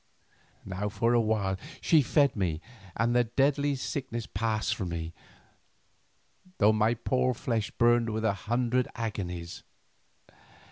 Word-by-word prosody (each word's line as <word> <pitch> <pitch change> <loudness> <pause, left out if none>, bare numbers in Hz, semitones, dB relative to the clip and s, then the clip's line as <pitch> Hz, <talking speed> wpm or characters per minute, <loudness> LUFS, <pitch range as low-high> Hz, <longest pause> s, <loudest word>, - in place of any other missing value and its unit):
Now 95 +2 -3
for 115 +3 +1
a 120 - +4
while 105 -4 0 0.2
she 160 -3 +4
fed 140 +1 +3
me 90 -6 -1 0.4
and 120 +2 +1
the 120 0 +4
deadly 140 +4 +1
sickness 125 -3 -4
passed 110 -1 -1
from 95 -6 -4
me, 85 -1 -4 1.4
though 105 +1 +5
my 110 +2 +2
poor 125 +2 0
flesh 115 -2 -1
burned 120 0 +3
with 110 0 -2
a 105 - +3 0.2
hundred 125 +1 +1
agonies. 90 -7 -4
115 Hz, 130 wpm, -29 LUFS, 105-120 Hz, 1.4 s, though